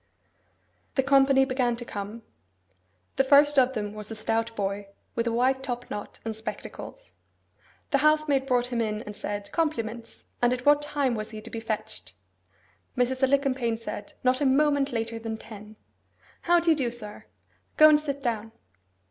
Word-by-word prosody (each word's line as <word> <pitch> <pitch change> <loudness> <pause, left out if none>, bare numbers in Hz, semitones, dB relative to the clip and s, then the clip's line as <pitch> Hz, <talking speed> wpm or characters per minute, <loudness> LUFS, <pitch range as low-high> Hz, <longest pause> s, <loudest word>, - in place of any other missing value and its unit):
The 265 - +3
company 270 0 +5
began 255 -2 0
to 240 +1 -7
come. 210 +2 -6 0.9
The 270 - +5
first 285 +1 +6
of 260 0 +3
them 210 -2 -3
was 210 -1 -8
a 225 - -5
stout 225 +1 -1
boy, 200 0 -2 0.3
with 230 0 -1
a - - +1
white 260 +3 +2
top 245 -2 -5
knot 205 - -6
and 225 -1 -3
spectacles. 240 - -8 0.8
The - - +3
housemaid 305 -3 +3
brought 245 -1 +1
him 235 - +1
in 215 0 -2
and 210 -2 -8
said, 205 -1 -5
'Compliments, 235 -8 -3 0.2
and 245 0 +4
at 250 0 -5
what 290 0 +6
time 290 -3 0
was 215 -1 -4
he 215 - -7
to 230 - -10
be 230 - -4
fetched!' 150 - -5 0.8
Mrs. 255 +1 +1
Alicumpaine 265 -4 +2
said, 220 -2 -7
'Not 255 +2 +2
a - - +2
moment 285 0 +3
later 230 -1 -3
than 225 -1 -4
ten. 215 -1 -11 0.7
How 345 0 +4
do 335 0 +3
you - - +5
do, 265 -5 0
sir? 220 -3 -6 0.5
Go 310 - +9
and 300 -1 +6
sit 280 -2 -4
down. 225 -2 -2
240 Hz, 175 wpm, -27 LUFS, 220-275 Hz, 0.9 s, Go